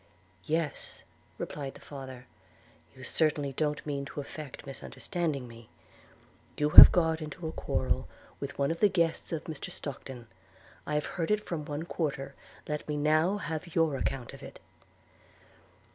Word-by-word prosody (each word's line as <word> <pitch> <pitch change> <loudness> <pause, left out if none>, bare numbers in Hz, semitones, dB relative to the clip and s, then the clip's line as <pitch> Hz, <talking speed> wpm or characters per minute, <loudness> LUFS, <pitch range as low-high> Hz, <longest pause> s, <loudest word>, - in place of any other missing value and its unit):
'Yes,' 160 -1 -2 0.3
replied 140 -2 -5
the - - -12
father; 130 -3 -9 0.7
'you 130 - -12
certainly 145 -1 0
don't 150 +1 -1
meant 140 -2 -3
to 145 - -7
affect 145 -1 -8
misunderstanding 140 0 -4
me. 115 -1 -13 0.9
You 150 0 +1
have - - +14
got 160 -2 +2
into 155 +2 -6
a - - -3
quarrel 65 - -1 0.3
with - - -6
one 140 +1 +1
of 165 - -3
the 210 - +5
guests 170 -4 0
of 160 -2 -2
Mr 155 -3 -6
Stockton: 130 -3 -7 0.6
I 150 - -1
have 150 - 0
heard 165 -3 -3
of 210 - +4
it - - -21
from 155 -4 -4
one 145 +2 -4
quarter; 145 -5 -3 0.3
let 150 0 -3
me 150 - -1
now 155 +6 +3
have 165 -2 -5
your 160 -3 +3
account 130 -2 -3
of - - -11
it.' - - -10
150 Hz, 160 wpm, -30 LUFS, 140-160 Hz, 0.9 s, have